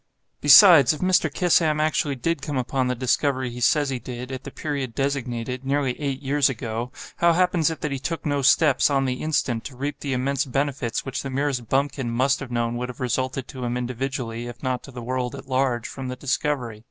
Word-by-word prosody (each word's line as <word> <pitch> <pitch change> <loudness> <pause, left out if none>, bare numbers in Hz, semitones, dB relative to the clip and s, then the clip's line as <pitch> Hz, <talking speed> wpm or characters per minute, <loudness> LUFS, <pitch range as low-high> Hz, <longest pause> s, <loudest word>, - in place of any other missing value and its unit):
Besides, 145 - +8
if 155 - -8
Mr. 185 0 +2
Kissam 165 -4 +2
actually 155 -2 +1
did 165 +4 -2
come 145 -1 -3
upon 130 +1 0
the 125 - 0
discovery 130 +1 0
he 120 - -7
says 145 +3 +3
he 130 - -2
did, 125 +2 -7
at 130 - -6
the - - -5
period 140 -6 -4
designated—nearly 135 0 -2
eight 140 -1 -3
years 140 0 +2
ago—how 120 +7 -2
happens 180 -2 +2
it 160 - -6
that 150 - -2
he 135 - -2
took 165 +4 -4
no 145 -2 0
steps, 135 +1 +4
on 135 -1 +1
the 130 -1 -2
instant, 130 -7 0
to 135 - -8
reap 140 +3 -4
the 140 -2 -3
immense 135 +2 0
benefits 135 -2 -2
which 135 -1 -3
the 135 - -5
merest 135 -3 -2
bumpkin 135 -2 0
must 130 +4 +1
have 135 - -7
known 120 0 -1
would 125 +1 -4
have 125 - -9
resulted 130 +1 -2
to 130 -3 -7
him 120 0 -1
individually, 125 -1 -4
if 120 -1 -10
not 130 -1 -1
to - - -12
the 125 -3 -8
world 125 0 -2
at - - -10
large, 130 -3 0
from 135 -1 -7
the 125 - -4
discovery? 130 -3 -2
135 Hz, 210 wpm, -24 LUFS, 125-145 Hz, -, Besides